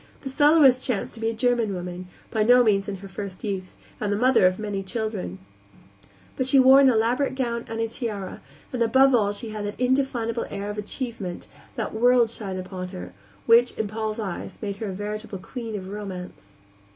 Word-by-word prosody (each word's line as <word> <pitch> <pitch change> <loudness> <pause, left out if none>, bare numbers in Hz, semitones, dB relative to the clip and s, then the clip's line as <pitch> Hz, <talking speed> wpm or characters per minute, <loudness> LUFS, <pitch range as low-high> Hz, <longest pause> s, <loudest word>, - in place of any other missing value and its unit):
The 270 - -5
soloist 290 -2 +5
chanced 250 -7 -2
to 230 - -9
be 225 0 0
a - - -2
German 235 -3 +1
woman, 180 0 -6 0.2
by 220 - 0
no 245 +3 +6
means 200 -3 +2
in 200 - -3
her - - -7
first 190 -1 -7
youth, 190 -4 -4 0.2
and 210 -1 -1
the 205 - +1
mother 245 -5 +5
of 185 0 0
many 205 -2 -3
children; 210 - -4 1.0
but 260 - -1
she 275 - +4
wore 265 +1 +8
an 275 -1 +6
elaborate 245 +4 +1
gown 235 -3 -2
and 225 0 -5
a 225 - 0
tiara, 215 -5 -5 0.3
and 250 - -2
above 265 +4 +5
all 210 -4 +3
she 210 +2 -5
had 215 -1 -5
that 205 +2 -5
indefinable 250 -3 0
air 200 +1 -4
of 210 - -5
achievement, 210 -4 -5 0.3
that - - -3
world 240 0 +4
shine 195 -5 -5
upon 185 0 -5
her, 90 - -8 0.3
which, 235 +2 +5
in 220 - -1
Paul's 215 +1 -3
eyes, 195 -5 -5
made 200 -2 -4
her 220 - -4
a - - -3
veritable 210 +2 -5
queen 225 +3 -6
of 185 -1 -7
Romance. 190 - -7
220 Hz, 200 wpm, -25 LUFS, 195-245 Hz, 1.0 s, wore